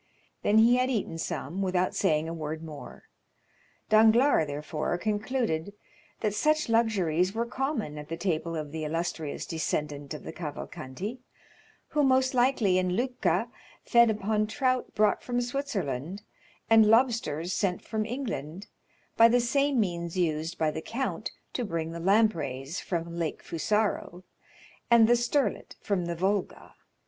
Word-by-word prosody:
Then 210 Hz, -, +3 dB
he 235 Hz, +3 st, +6 dB
had 255 Hz, +1 st, +1 dB
eaten 205 Hz, -9 st, -2 dB
some 170 Hz, +3 st, -4 dB
without 185 Hz, -1 st, 0 dB
saying 160 Hz, -5 st, +1 dB
a 165 Hz, -, -4 dB
word 160 Hz, 0 st, -5 dB
more; 155 Hz, -3 st, -10 dB, 0.8 s
Danglars, 220 Hz, -, +5 dB
therefore, 150 Hz, +3 st, -3 dB
concluded 210 Hz, -3 st, -1 dB, 0.5 s
that 210 Hz, -2 st, 0 dB
such 305 Hz, +5 st, +1 dB
luxuries 195 Hz, -5 st, +2 dB
were 230 Hz, +1 st, 0 dB
common 240 Hz, -, -3 dB
at 150 Hz, 0 st, -10 dB
the 165 Hz, -, -4 dB
table 165 Hz, -2 st, -2 dB
of 155 Hz, -2 st, -4 dB
the 160 Hz, 0 st, -4 dB
illustrious 160 Hz, -1 st, -3 dB
descendant 150 Hz, -2 st, -3 dB
of -, -, -9 dB
the -, -, -6 dB
Cavalcanti, 160 Hz, -, -6 dB, 0.7 s
who 300 Hz, -, +1 dB
most 260 Hz, -1 st, +3 dB
likely 240 Hz, -7 st, +3 dB
in 180 Hz, -1 st, 0 dB
Lucca 250 Hz, +3 st, 0 dB, 0.4 s
fed 235 Hz, -1 st, +5 dB
upon 215 Hz, 0 st, 0 dB
trout 255 Hz, +2 st, -1 dB
brought 210 Hz, -1 st, +3 dB
from 245 Hz, -1 st, -2 dB
Switzerland, 200 Hz, -, -3 dB, 0.4 s
and 225 Hz, -1 st, +6 dB
lobsters 220 Hz, -, +2 dB
sent 185 Hz, -2 st, -1 dB
from 220 Hz, -1 st, -2 dB
England, 205 Hz, -, -5 dB, 0.5 s
by 230 Hz, -, +8 dB
the 245 Hz, +1 st, +3 dB
same 275 Hz, +2 st, +1 dB
means 170 Hz, -3 st, -2 dB
used 160 Hz, -1 st, -1 dB
by 155 Hz, -1 st, +1 dB
the 160 Hz, -, -5 dB
count 260 Hz, +9 st, -3 dB, 0.2 s
to 250 Hz, -, -2 dB
bring 165 Hz, -5 st, -3 dB
the 170 Hz, -, -6 dB
lampreys 170 Hz, -, +1 dB
from 170 Hz, -1 st, -4 dB
Lake 165 Hz, -2 st, -3 dB
Fusaro, 190 Hz, 0 st, -1 dB, 0.7 s
and 235 Hz, -2 st, +7 dB
the 240 Hz, -, +5 dB
sterlet 240 Hz, +4 st, -1 dB
from 195 Hz, -4 st, -1 dB
the 170 Hz, 0 st, -3 dB
Volga. 190 Hz, +3 st, -2 dB
195 Hz, 145 wpm, -28 LUFS, 165-235 Hz, 0.8 s, by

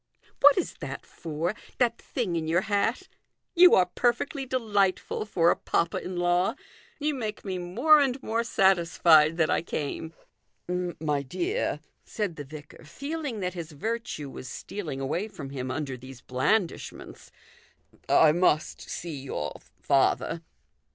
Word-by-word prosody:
" -, -, -31 dB
What 285 Hz, 0 st, +8 dB
is 370 Hz, -, -1 dB
that -, -, -6 dB
for? 165 Hz, +3 st, -3 dB, 0.2 s
that 235 Hz, -2 st, +1 dB
thing 215 Hz, -10 st, -2 dB
in 160 Hz, -1 st, -2 dB
your 170 Hz, +3 st, +2 dB
hat? 220 Hz, -, 0 dB, 0.5 s
You 355 Hz, +1 st, +8 dB
are 185 Hz, -, +5 dB
perfectly 245 Hz, -, -1 dB
delightful 210 Hz, -6 st, 0 dB
for 170 Hz, -4 st, +3 dB
a -, -, +2 dB
papa 170 Hz, -, 0 dB
in 180 Hz, 0 st, -5 dB
law. 175 Hz, +5 st, +2 dB, 0.4 s
You 300 Hz, 0 st, 0 dB
make 220 Hz, -6 st, -5 dB
me 185 Hz, -2 st, -3 dB
more 245 Hz, -, +5 dB
and 270 Hz, -3 st, +2 dB
more 230 Hz, +1 st, 0 dB
satisfied 170 Hz, -6 st, +4 dB
that 160 Hz, -2 st, +2 dB
I -, -, +2 dB
came." 160 Hz, 0 st, -4 dB, 0.4 s
" -, -, -48 dB, 0.3 s
My 150 Hz, -3 st, 0 dB
dear," 355 Hz, -, -2 dB, 0.2 s
said 205 Hz, -7 st, -3 dB
the 145 Hz, -, -6 dB
vicar, 150 Hz, +2 st, -11 dB
feeling 280 Hz, -, -5 dB
that 180 Hz, -1 st, -2 dB
his 170 Hz, -3 st, -7 dB
virtue 185 Hz, -5 st, -4 dB
was 130 Hz, -, -8 dB
stealing 155 Hz, -4 st, -6 dB
away 160 Hz, +10 st, -2 dB
from 140 Hz, -10 st, -9 dB
him 130 Hz, -2 st, -4 dB
under 135 Hz, 0 st, -3 dB
these 130 Hz, 0 st, -11 dB
blandishments, 165 Hz, +10 st, -2 dB, 0.4 s
" -, -, -32 dB
I 155 Hz, -, +6 dB
must 165 Hz, -2 st, +1 dB
see 170 Hz, -2 st, -5 dB
your 75 Hz, -, -4 dB, 0.3 s
father." 140 Hz, +4 st, +2 dB
175 Hz, 150 wpm, -27 LUFS, 155-230 Hz, 0.5 s, What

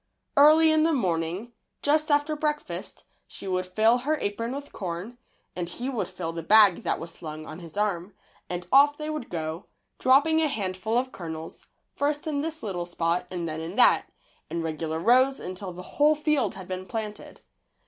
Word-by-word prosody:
Early 310 Hz, +3 st, +7 dB
in 315 Hz, 0 st, +4 dB
the 325 Hz, +1 st, +3 dB
morning, 180 Hz, -, -1 dB, 0.3 s
just 305 Hz, +2 st, +2 dB
after 290 Hz, +1 st, +2 dB
breakfast, 300 Hz, 0 st, -3 dB, 0.2 s
she -, -, -10 dB
would 185 Hz, -1 st, -1 dB
fill 220 Hz, +6 st, +3 dB
her 300 Hz, +5 st, 0 dB
apron 230 Hz, +5 st, -2 dB
with 285 Hz, 0 st, -7 dB
corn, 190 Hz, +6 st, -5 dB, 0.4 s
and 175 Hz, -1 st, -2 dB
he 245 Hz, +9 st, -3 dB
would 240 Hz, -, -2 dB
fill 180 Hz, -3 st, -5 dB
the 165 Hz, -, -4 dB
bag 205 Hz, +1 st, +6 dB
that -, -, -1 dB
was 165 Hz, +1 st, -7 dB
slung 155 Hz, -2 st, -8 dB
on 155 Hz, +2 st, -8 dB
his 170 Hz, 0 st, -11 dB
arm, 195 Hz, -2 st, -1 dB, 0.3 s
and 180 Hz, 0 st, -4 dB
off 290 Hz, +2 st, +6 dB
they 305 Hz, 0 st, -4 dB
would 305 Hz, -6 st, -5 dB
go, 160 Hz, +1 st, -4 dB, 0.3 s
dropping 290 Hz, +5 st, +4 dB
a 315 Hz, -, +3 dB
handful 210 Hz, -2 st, -2 dB
of 255 Hz, +1 st, 0 dB
kernels, 160 Hz, -4 st, -8 dB, 0.3 s
first 290 Hz, +1 st, -1 dB
in 295 Hz, -3 st, -1 dB
this 320 Hz, 0 st, -5 dB
little 180 Hz, -5 st, -3 dB
spot 175 Hz, 0 st, -1 dB
and 175 Hz, -2 st, -4 dB
then 160 Hz, 0 st, -4 dB
in 165 Hz, +4 st, -6 dB
that, 250 Hz, -, +5 dB, 0.4 s
in 170 Hz, -1 st, -3 dB
regular 160 Hz, 0 st, -3 dB
rows 255 Hz, +9 st, +4 dB
until 185 Hz, +1 st, -6 dB
the 180 Hz, +1 st, -9 dB
whole 295 Hz, +9 st, +3 dB
field 300 Hz, -9 st, 0 dB
had 190 Hz, -2 st, -9 dB
been 185 Hz, 0 st, -5 dB
planted. 215 Hz, 0 st, -6 dB
210 Hz, 185 wpm, -26 LUFS, 175-285 Hz, 0.4 s, Early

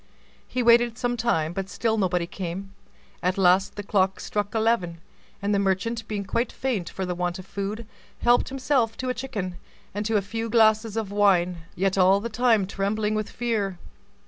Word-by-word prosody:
He 250 Hz, -, -1 dB
waited 235 Hz, 0 st, +5 dB
some 245 Hz, -1 st, -1 dB
time, 175 Hz, -9 st, 0 dB
but 195 Hz, +1 st, -4 dB
still 225 Hz, +1 st, 0 dB
nobody 180 Hz, -4 st, +1 dB
came: 190 Hz, +2 st, -6 dB, 0.5 s
at 180 Hz, +1 st, 0 dB
last 190 Hz, 0 st, +3 dB
the 205 Hz, -, -5 dB
clock 190 Hz, -1 st, +1 dB
struck 205 Hz, +1 st, -3 dB
eleven, 220 Hz, -7 st, +1 dB, 0.5 s
and 205 Hz, +1 st, +1 dB
the 200 Hz, -, +2 dB
merchant, 210 Hz, +4 st, -1 dB
being 205 Hz, -2 st, -3 dB
quite 235 Hz, +5 st, -1 dB
faint 225 Hz, -10 st, -2 dB
for 190 Hz, -, -4 dB
the 180 Hz, -, -2 dB
want 175 Hz, +1 st, -2 dB
of 185 Hz, -, -9 dB
food, 200 Hz, +4 st, -4 dB, 0.4 s
helped 240 Hz, 0 st, +4 dB
himself 260 Hz, -4 st, 0 dB
to 255 Hz, -, -3 dB
a -, -, +1 dB
chicken, 200 Hz, -10 st, -4 dB, 0.4 s
and 205 Hz, +1 st, -2 dB
to 225 Hz, -1 st, +2 dB
a 200 Hz, -, 0 dB
few 225 Hz, +3 st, -4 dB
glasses 220 Hz, -1 st, +3 dB
of 215 Hz, -3 st, -2 dB
wine, 180 Hz, -5 st, +2 dB
yet 195 Hz, +1 st, +1 dB
all 190 Hz, +2 st, +5 dB
the 230 Hz, +3 st, -4 dB
time 225 Hz, -3 st, +3 dB
trembling 210 Hz, +2 st, -1 dB
with 215 Hz, -1 st, -2 dB
fear. 215 Hz, -6 st, -2 dB
205 Hz, 185 wpm, -25 LUFS, 190-230 Hz, 0.5 s, waited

